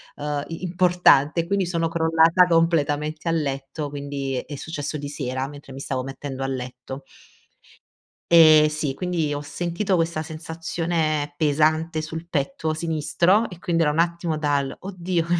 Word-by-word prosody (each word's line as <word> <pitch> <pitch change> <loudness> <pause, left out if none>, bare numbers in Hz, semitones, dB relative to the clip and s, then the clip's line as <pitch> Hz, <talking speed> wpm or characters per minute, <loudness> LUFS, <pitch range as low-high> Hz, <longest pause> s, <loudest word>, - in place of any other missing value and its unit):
ehm, 145 -1 -3
i 165 +2 -7
importante 175 -4 +4
e - - -6
quindi 195 -1 0
sono 170 -2 0
crollata 165 +2 +4
completamente 155 -2 +1
a - - +2
letto 145 -1 -3
quindi 140 -1 -4
è 145 - -7
successo 150 +1 -4
di 145 -1 -5
sera 130 -2 -3
mentre 145 -1 -11
mi 135 - -8
stavo 130 -1 -2
mettendo 135 0 -6
a 135 - -1
letto. 130 +1 -6 1.3
E 155 -2 +8
sì 150 -2 -2
quindi 165 -1 -1
ho 145 - -3
sentito 175 +6 -2
questa 165 -2 0
sensazione 160 -1 -2
pesante 155 +2 +2
sul 160 +2 -6
petto 160 +1 -1
sinistro 170 +6 +1
e 180 - -11
quindi 170 -2 +1
era 150 - +2
un 155 - -2
attimo 170 -1 0
dal 145 -3 0
“oddio 180 -3 -2
155 Hz, 150 wpm, -23 LUFS, 145-170 Hz, 1.3 s, E